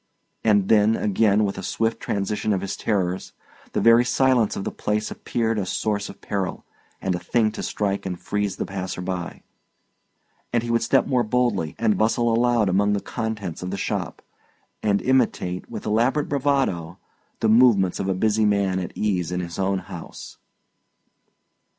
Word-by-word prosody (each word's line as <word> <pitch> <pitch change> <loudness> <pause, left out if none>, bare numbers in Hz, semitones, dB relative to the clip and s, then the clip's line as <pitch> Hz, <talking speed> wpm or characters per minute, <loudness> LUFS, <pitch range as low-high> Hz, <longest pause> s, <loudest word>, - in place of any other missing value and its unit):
And 105 -3 +3
then, 110 0 +4
again, 105 0 +2
with 100 -1 -3
a - - -4
swift 115 +4 -1
transition 105 +1 -1
of 95 - -1
his 100 - -3
terrors, 95 -4 -1 0.4
the - - +1
very 115 +1 +6
silence 125 -3 +2
of 95 - -4
the - - -3
place 105 +1 -2
appeared 115 -2 -1
a 95 - -1
source 105 -2 -1
of - - -12
peril, 95 -2 -3 0.3
and 95 - -1
a 90 - -2
thing 110 +3 +1
to - - -6
strike 100 -1 -2
and 90 -2 -4
freeze 105 -1 -2
the - - -3
passer 95 -2 -5
by; 90 -1 -5 1.1
and 120 -1 +1
he 120 - -3
would 115 - +2
step 135 +3 +3
more 125 -2 +2
boldly, 110 -8 0
and 110 -4 +1
bustle 115 +1 +2
aloud 120 -2 +3
among 100 +2 +2
the 100 - +1
contents 105 -6 -4
of 90 - -4
the 100 - -3
shop, - - -3 0.6
and 100 -2 +1
imitate, 115 -8 0
with - - -7
elaborate 120 +7 +1
bravado, 135 - 0 0.4
the 110 - +1
movements 110 -5 +4
of 95 - -1
a 95 - +1
busy 110 +3 +2
man 100 -3 +2
at 90 - -6
ease 90 -5 0
in 90 - -1
his 85 +1 -5
own 95 0 +1
house. 90 -2 -9
105 Hz, 175 wpm, -23 LUFS, 95-115 Hz, 1.1 s, very